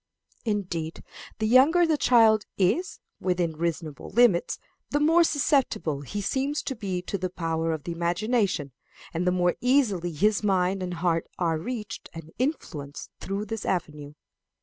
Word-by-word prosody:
Indeed, 180 -7 -3 0.3
the 220 - -1
younger 275 +10 +6
the 320 -2 +2
child 225 -6 +4
is, 265 - +1 0.2
within 180 -3 0
reasonable 160 -2 -3
limits, 230 -8 +3 0.3
the 290 - +1
more 325 +3 +5
susceptible 265 - +1
he 205 +9 -5
seems 275 +8 -1
to 270 - -3
be 190 -5 -3
to 200 - -3
the 185 0 -2
power 165 -2 -1
of 155 -3 -3
the 170 - -4
imagination, 175 - 0 0.4
and 175 +2 -1
the - - +4
more 180 -1 +2
easily 230 -9 +2
his 205 +6 +2
mind 190 -2 +1
and 180 -1 -3
heart 165 -1 0
are 165 -3 0
reached 225 +3 -6
and 165 -1 -9
influenced 155 - -3
through 200 +2 -3
this 220 +1 -5
avenue. 150 -5 -3
185 Hz, 150 wpm, -26 LUFS, 165-235 Hz, 0.4 s, younger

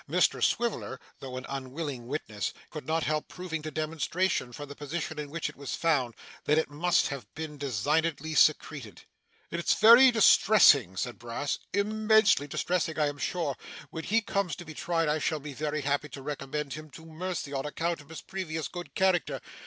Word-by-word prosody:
Mr - - +2
Swiveller, 235 -1 0 0.2
though 130 -1 -7
an 130 - -6
unwilling 135 -1 -5
witness, 110 -8 -3 0.2
could 150 - -8
not 160 0 +1
help 155 0 -1
proving 180 -3 -5
to 155 - -5
demonstration, 155 0 -1
from 145 +4 -8
the 145 - -8
position 150 +1 -4
in 150 -1 -5
which 165 +2 -3
it 150 - -8
was 140 -1 -5
found, 135 -8 +1 0.3
that 150 - +3
it 160 - 0
must 170 +4 +2
have 140 -3 -7
been 155 -1 -5
designedly 145 +4 0
secreted. 150 -7 +2 0.5
'It's 170 0 +1
very 235 +4 +9
distressing,' 185 - +6
said 125 +4 -3
Brass, 120 +4 -3
'immensely 215 -4 +3
distressing, 165 +2 -1
I 150 -2 +2
am 145 0 -8
sure. 155 -2 -1 0.4
When 160 -1 -6
he 225 +4 +2
comes 200 -5 -1
to 175 - -10
be 160 - -9
tried, 165 +1 0
I 150 +1 +1
shall 155 +1 -1
be 145 0 -8
very 150 +1 -2
happy 145 +1 -1
to 135 - -9
recommend 145 0 -4
him 155 +2 -8
to 160 - -13
mercy 165 -2 -5
on 135 +1 -2
account 165 +1 -2
of 145 - -19
his 165 - -8
previous 160 -6 -4
good 175 +6 -8
character. 190 -3 +2
155 Hz, 185 wpm, -29 LUFS, 140-170 Hz, 0.5 s, very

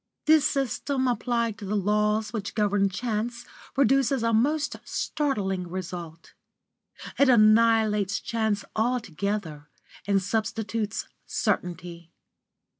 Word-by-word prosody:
This 305 -1 +5
system 270 0 -1
applied 235 -3 -1
to 205 - -7
the 205 +2 -2
laws 210 +2 +1
which 210 -3 -4
govern 205 -2 +2
chance 235 +3 -3 0.3
produces 270 -1 +3
a 230 0 +1
most 290 +7 +1
startling 195 -11 -2
result. 170 -2 -7 0.9
It 280 -1 +5
annihilates 215 -3 +4
chance 220 -3 -1
altogether, 200 -9 -2 0.4
and 200 -1 +3
substitutes 220 +2 -2 0.2
certainty. 170 -1 -2
215 Hz, 100 wpm, -26 LUFS, 195-240 Hz, 0.9 s, This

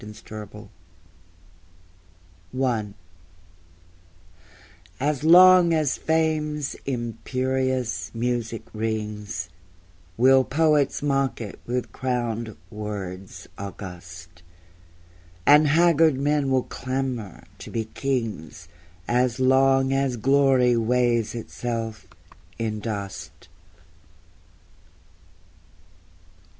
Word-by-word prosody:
Three 105 0 -9
Quatrains 105 +2 -12 1.9
I 115 -6 0 2.1
As 145 +1 -1
long 175 0 +7
as 155 -3 +1
Fame's 155 -2 0
imperious 125 -4 -2
music 115 -1 -2
rings 105 -5 -4 0.7
Will 130 +2 +6
poets 150 0 +1
mock 135 -2 0
it 110 -4 -7
with 125 +1 -2
crowned 120 -4 -3
words 100 -3 -7
august; 85 -3 -9 1.0
And 150 +1 +7
haggard 160 -1 +4
men 145 0 +1
will 130 -1 +2
clamber 130 -6 -4 0.2
to - - -9
be 115 -1 -2
kings 110 - -4 0.4
As 125 +1 +1
long 135 +1 +4
as 135 -2 0
Glory 130 0 +3
weighs 120 -1 +1
itself 115 -1 -5 0.5
in 110 -2 -2
dust. 100 -5 -6
125 Hz, 75 wpm, -24 LUFS, 105-135 Hz, 2.1 s, long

